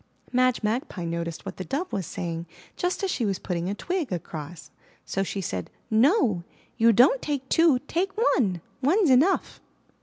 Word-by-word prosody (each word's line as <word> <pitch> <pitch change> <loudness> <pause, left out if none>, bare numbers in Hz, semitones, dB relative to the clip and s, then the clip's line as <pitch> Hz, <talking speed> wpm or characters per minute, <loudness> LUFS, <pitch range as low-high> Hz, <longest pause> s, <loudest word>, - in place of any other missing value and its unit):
Madge 255 -2 +2
Magpie 210 -5 -2
noticed 170 0 -4
what - - -6
the 185 - -4
Dove 295 - -3
was 190 -4 -2
saying 170 -1 -4 0.3
just 360 +2 -2
as 385 - +1
she 245 - -1
was 200 -3 0
putting 175 0 -3
a 200 - -2
twig 350 - -2
across. 160 -2 -6 0.3
So 195 - -2
she 195 0 -2
said: 95 - -4 0.2
*'No, 225 - +3 0.3
you 230 +1 +5
don't 255 - +5
take 280 -3 -3
two. 325 -5 +5
Take 385 +4 -1
one! 210 - +2 0.2
One's 330 +4 +3
enough!" 295 +10 +3
230 Hz, 170 wpm, -26 LUFS, -, 0.3 s, you